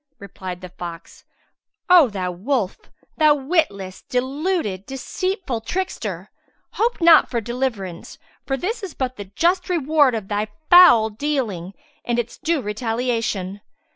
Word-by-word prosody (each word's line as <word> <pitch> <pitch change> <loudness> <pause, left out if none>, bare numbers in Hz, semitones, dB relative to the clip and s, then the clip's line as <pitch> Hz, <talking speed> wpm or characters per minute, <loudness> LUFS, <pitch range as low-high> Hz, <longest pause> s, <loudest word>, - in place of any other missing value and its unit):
Replied 185 -2 -8
the 185 - -8
fox, 175 -2 -9 0.6
"O 350 -7 +7
thou 185 -3 -3
wolf, 205 +2 -2 0.4
thou 305 -2 +5
witless, 265 - -1
deluded, 260 - -2
deceitful 270 - -3
trickster! 375 +11 -4 0.4
hope 470 +3 0
not 330 -2 +7
for 240 - -1
deliverance, 230 -7 -4 0.3
for 270 - -2
this 440 - -3
is 380 -6 -7
but 255 -1 -3
the 205 - -6
just 345 - 0
reward 300 -6 +3
of 215 -3 -5
thy 210 +1 -1 0.2
foul 320 -12 +8
dealing 215 - -3 0.3
and 240 -1 -1
its 235 0 -3
due 325 -5 0
retaliation." 220 -3 -2
245 Hz, 130 wpm, -21 LUFS, 200-315 Hz, 0.6 s, foul